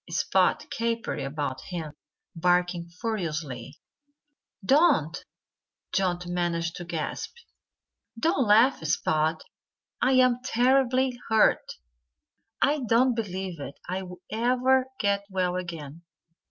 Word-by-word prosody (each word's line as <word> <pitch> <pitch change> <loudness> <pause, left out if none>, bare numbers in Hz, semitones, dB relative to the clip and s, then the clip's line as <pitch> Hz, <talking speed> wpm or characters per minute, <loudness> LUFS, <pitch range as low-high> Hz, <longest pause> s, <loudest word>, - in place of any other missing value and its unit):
Spot - - +1
capered 230 0 -2
about 140 -1 -3
him, 165 -4 -5 0.4
barking 175 0 +1
furiously. 155 - -4 0.9
"Don't!" 270 - +3 0.7
Johnnie 180 -2 0
managed 170 -1 -1
to 175 - -7
gasp. 165 - -4 0.8
"Don't 320 - +2
laugh, 225 0 +5
Spot! 155 0 0 0.6
I'm 255 -1 +4
terribly 255 0 +2
hurt. 220 -1 +3 0.9
I 295 +2 +3
don't 245 +1 +3
believe 190 -6 -4 0.3
I'll 180 0 -5
ever 255 +3 +2
get 200 -1 +1
well 185 -2 0
again." 165 -4 -6
185 Hz, 90 wpm, -27 LUFS, 170-245 Hz, 0.9 s, laugh